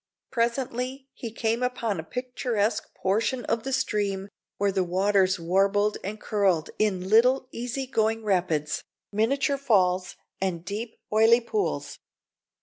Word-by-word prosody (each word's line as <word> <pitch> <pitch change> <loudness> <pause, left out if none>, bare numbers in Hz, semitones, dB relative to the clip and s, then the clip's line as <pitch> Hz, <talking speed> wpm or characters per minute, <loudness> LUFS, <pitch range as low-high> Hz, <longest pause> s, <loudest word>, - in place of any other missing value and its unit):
Presently 255 +2 -1
he 230 - -6
came 225 +1 -1
upon 235 -6 -1
a - - -4
picturesque 245 - -2
portion 225 +6 0
of 230 - 0
the 270 - -4
stream 205 -6 -1 0.3
where 200 0 +2
the 190 -1 +1
waters 190 +1 +2
warbled 195 +4 +2
and 210 +3 -5
curled 195 -8 +1
in 190 -4 +1
little 250 +5 +4
easy 245 +3 -3
going 225 -3 0
rapids, 175 -7 0 0.3
miniature 275 +7 +1
falls, 185 -8 +2 0.3
and 175 -3 -2
deep 215 +4 -5 0.2
oily 225 +2 +6
pools. 405 - -2
215 Hz, 130 wpm, -26 LUFS, 195-245 Hz, 0.3 s, oily